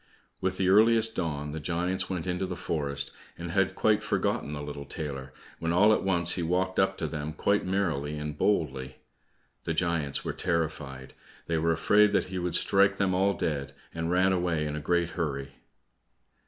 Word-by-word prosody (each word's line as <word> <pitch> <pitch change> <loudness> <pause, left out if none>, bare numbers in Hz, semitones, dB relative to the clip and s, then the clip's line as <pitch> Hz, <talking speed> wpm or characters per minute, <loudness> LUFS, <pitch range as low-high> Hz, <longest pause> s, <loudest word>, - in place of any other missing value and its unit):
With 95 0 -1
the 95 - +1
earliest 110 +3 +4
dawn 75 -4 -2
the 80 - -4
giants 85 +4 -1
went 90 -4 -3
into 90 +1 -1
the 90 - -4
forest, 70 -4 -2 0.3
and - - -5
had - - +1
quite - - +3
forgotten 70 - -1
the 75 -1 -5
little 75 -1 -6
tailor, 70 -4 -5 0.3
when 80 0 -1
all 105 +5 +5
at - - +1
once 85 -3 +4
he 90 - -1
walked 90 +2 0
up 95 0 +2
to 80 - -2
them 75 0 -4
quite 100 +4 +1
merrily 80 -7 -1
and 75 0 -4
boldly. 65 -9 0 0.7
The 85 - -2
giants 85 -5 0
were - - -2
terrified, 80 -6 -3 0.3
they 85 -1 0
were 85 +1 +2
afraid 105 +5 +4
that 95 - +1
he 95 -1 -3
would 90 -1 -1
strike 100 0 +3
them 95 -2 +1
all 95 +2 +2
dead, 70 -3 -2 0.2
and 80 0 -3
ran 95 +2 +3
away 85 -4 0
in 75 0 -3
a - - -3
great 85 +3 0
hurry. 70 -4 -3
85 Hz, 185 wpm, -28 LUFS, 75-95 Hz, 0.7 s, all